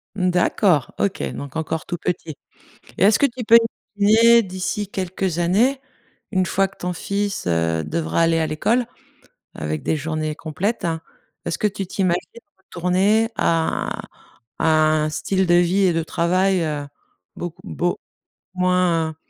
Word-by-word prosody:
Mmh, 185 -2 +1
d'accord, 175 - +2
OK, 200 - 0
donc 140 0 -8
encore 160 0 -3
tout 175 - -4
petit. 165 -4 -4 0.6
Et - - +2
est-ce 205 +2 +5
que - - +5
tu 245 -2 -3
peux 230 +1 +8 0.4
essayer 225 +3 +6
d'ici 190 +2 -3
quelques 185 -2 -2
années, 225 +11 +2 0.5
une 185 -2 +2
fois 195 +2 +1
que 195 - -21
ton 180 0 -3
fils, 200 - -3
heu, 80 -1 +1
devra 80 - -1
aller 165 0 +3
à 160 - 0
l'école, 225 +11 +1 0.7
avec 75 0 -4
des 160 - 0
journées 155 0 -3
complètes, 170 +9 -3
hein 165 -1 -1 0.4
est-ce 170 - -3
que 210 - +2
tu 195 -2 -5
t'imagines 180 -2 0 0.4
retourner 190 +5 +1
à 165 -1 0
un - - -6 0.6
à - - +2 0.4
un 155 - -1
style 185 +5 0
de 175 - +4
vie 175 +3 +3
et 185 -2 +4
de 165 0 0
travail, 180 +3 +1
heu, 150 -2 -3 0.5
beaucoup 175 0 -6
beaucoup 175 -3 -2 0.5
moins 180 -3 +1
180 Hz, 155 wpm, -21 LUFS, 160-195 Hz, 0.7 s, peux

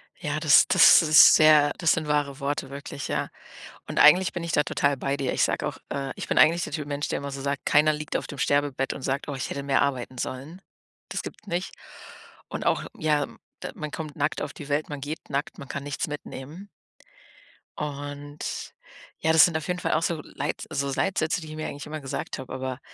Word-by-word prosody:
Ja, - - -3
das - - +6
das - - +8
ist 155 0 +8
sehr 155 -2 +6
das 170 -3 +2
sind 155 -2 -2
wahre 145 -2 0
Worte 140 -1 -3
wirklich, 140 0 -6
ja. - - -2 0.6
Und - - -2
eigentlich 175 +5 +7
bin 175 - -5
ich 170 - -3
da 150 - +4
total 140 -1 +1
bei 140 +2 -2
dir. 135 -2 -1
Ich - - +2
sage - - 0
auch - - -6
äh, 135 -1 -3
ich - - -6
bin - - -1
eigentlich 170 +2 +5
der - - -5
Typ 150 -2 -4
Mensch, 145 0 -3
der - - -1
immer 140 0 -5
so 135 0 -6
sagt, 140 0 -3
keiner 150 +1 +4
liegt 150 0 -6
auf - - -1
dem 145 - -8
Sterbebett 145 -2 0
und - - -9
sagt: 135 +1 -2
„Oh, 140 - -4
ich 130 - -4
hätte 140 - -4
mehr 140 -1 +2
arbeiten 130 -2 -2
sollen.“ 140 +10 -6 0.5
Das - - -3
gibt's 215 - -10
nicht. 175 +1 -3 0.7
Und - - -6
auch - - +1
ja, 150 -2 +1 0.4
d - - -4
man 155 -1 -6
kommt 155 -1 -6
nackt 150 +1 -1
auf - - -4
die 145 -2 -10
Welt, 145 +2 -1
man 145 -2 -6
geht 150 +3 -6
nackt, 140 +1 -3
man 140 - -9
kann 140 +2 -5
nichts 145 0 -3
mitnehmen. 150 +5 -8 1.1
Und 145 0 -6 0.5
ja, 160 - +2
das 160 - +8
sind 170 - -2
auf 160 - -6
jeden 180 0 -2
Fall - - -1
auch 155 - +2
so 165 -2 -1
Leit 145 +2 -5
so 140 -2 -1
Leitsätze, 175 +2 0
die 160 - -9
ich 155 - -8
mir 155 - -4
eigentlich 145 - -7
immer 155 0 -6
gesagt 135 0 -5
habe, 130 - -9
aber, 130 0 -4
145 Hz, 225 wpm, -26 LUFS, 140-155 Hz, 1.1 s, das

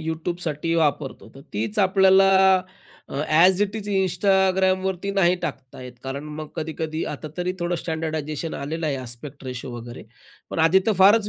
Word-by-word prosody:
YouTubeसाठी 160 0 -3
वापरतो, 150 -4 -1
तर 135 - -12
तीच 115 - -2
आपल्याला 190 0 +5 0.8
अ, - - -9
ॲज 180 +5 +5
इट 205 +1 -2
इज 210 -1 -6
Instagramवरती 190 0 +1
नाही 180 -2 +3
टाकता 130 0 -6
येत. 125 -1 -9
कारण 135 +2 -5
मग 150 0 -7
कधी-कधी 160 0 -3
आता 155 - -7
तरी 180 +1 -1
थोडं 175 0 0
स्टँडर्डायझेशन 160 -1 -3
आलेलं 160 +3 -3
आहे, 140 -2 0
आस्पेक्ट 130 +3 -9
रेशिओ 125 0 -6
वगैरे, 120 +1 -9 0.5
पण - - -4
आधी 165 +4 +5
तर 220 - +4
फारच 205 +2 +6
165 Hz, 155 wpm, -23 LUFS, 150-190 Hz, 0.8 s, फारच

